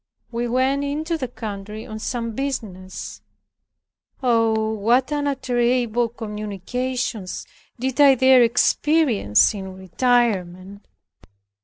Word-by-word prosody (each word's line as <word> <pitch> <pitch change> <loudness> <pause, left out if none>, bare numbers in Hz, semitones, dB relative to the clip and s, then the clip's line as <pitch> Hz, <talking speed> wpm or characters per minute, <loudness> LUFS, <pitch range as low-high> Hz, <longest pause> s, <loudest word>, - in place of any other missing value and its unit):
We 240 +1 -2
went 260 +3 +1
into 310 +4 -2
the 270 -5 -3
country 215 -2 -7
on 215 0 -7
some 230 +1 -3
business. 215 -8 -5 1.0
Oh! 225 -3 +2
what 235 +7 +2
unutterable 245 -5 0
communications 215 0 -4 0.3
did 265 +3 0
I 275 -2 +7
there 260 0 +6
experience 240 - +3
in 190 -2 -7
retirement! 195 -2 -1
235 Hz, 95 wpm, -22 LUFS, 210-260 Hz, 1.0 s, I